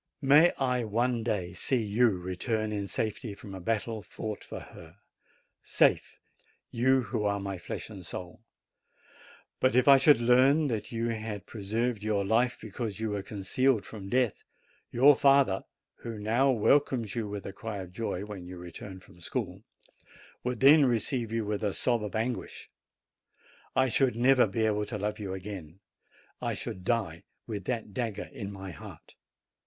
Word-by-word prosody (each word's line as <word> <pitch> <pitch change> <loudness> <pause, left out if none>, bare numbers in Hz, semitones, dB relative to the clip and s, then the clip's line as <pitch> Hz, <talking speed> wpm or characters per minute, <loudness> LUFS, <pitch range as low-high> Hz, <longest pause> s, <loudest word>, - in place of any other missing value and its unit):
May 150 +5 +7
I 125 -2 0
one 115 +2 0
day 105 -6 -2
see 125 -4 0
you 110 +4 +3
return 105 +4 -2
in 100 -1 -3
safety 110 +1 -3
from 100 -2 -11
a 95 - -6
battle 110 +2 -2
fought 105 +1 -6
for - - -7
her; 80 +3 -13 0.6
safe, - - +2 0.5
you 130 +2 +3
who 105 - -2
are 100 0 0
my 100 -2 -5
flesh - - -6
and 100 -4 -10
soul. 90 +3 -7 1.2
But 130 -1 +2
if 125 - +4
I 140 -1 +9
should 140 -1 +6
learn 130 +5 +4
that 110 -3 -3
you 115 0 -1
had 110 -2 -4
preserved 110 +2 -2
your 105 -2 0
life 120 +4 +2
because 110 -1 -5
you 110 -1 -2
were 100 -1 -2
concealed 105 +4 0
from 100 -3 -9
death, 125 -3 +1 0.5
your 140 +4 +6
father, 135 -8 +4 0.3
who 115 -2 -7
now 115 +6 +2
welcomes 125 -2 +2
you 115 -3 -2
with 100 -1 -6
a 95 - -6
cry 110 0 -6
of 90 -2 -8
joy 100 -2 -3
when 100 -4 -8
you 90 0 -8
return 90 +2 -9
from 90 - -19
school, 100 -2 -4 0.8
would 125 -2 -3
then 145 +3 +8
receive 120 -1 0
you 115 -1 -1
with 105 +1 -2
a 100 -2 0
sob 120 -3 +1
of 105 - -5
anguish. 115 +2 -3 1.0
I 130 0 +4
.should 125 0 +2
never 125 0 +5
be 110 +3 0
able 105 -1 0
to 105 - -4
love 105 +2 -3
you 95 -2 -4
again. 95 -3 -8 0.6
I - - -1
should 95 - -6
die 95 -7 -1 0.2
with 105 -5 -5
that 115 -5 -3
dagger 115 -2 -3
in 100 -1 -6
my 95 -1 -7
heart. - - -12
110 Hz, 170 wpm, -29 LUFS, 100-125 Hz, 1.2 s, I